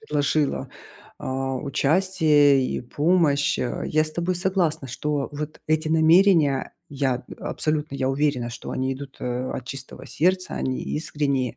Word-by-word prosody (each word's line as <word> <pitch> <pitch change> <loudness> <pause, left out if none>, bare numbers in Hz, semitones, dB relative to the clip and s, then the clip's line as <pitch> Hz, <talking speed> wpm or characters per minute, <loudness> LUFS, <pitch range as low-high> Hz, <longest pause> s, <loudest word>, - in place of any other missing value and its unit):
предложила, 150 -5 0 0.5
а, 135 0 -2
участие 145 -1 +3
и - - -3
помощь, 145 +2 +2
а. 120 - -2
Я 155 0 +2
с 155 - -6
тобой 175 +2 -1
согласна, 180 -6 0
что 145 +2 -2
вот 150 +1 -6
эти 155 0 +1
намерения. 160 -2 +4 0.2
Я, 135 -3 -1
э, - - -10
абсолютно 155 -2 -2
я 130 -1 0
уверена, 135 -4 0
что 120 - -8
они 130 +1 -1
идут, 135 0 -10
э, 125 +1 -3
от 130 - -5
чистого 130 +1 -8
сердца, 185 +3 0
они 130 -1 -2
искренние. 140 -5 -1
145 Hz, 145 wpm, -24 LUFS, 135-160 Hz, 0.5 s, намерения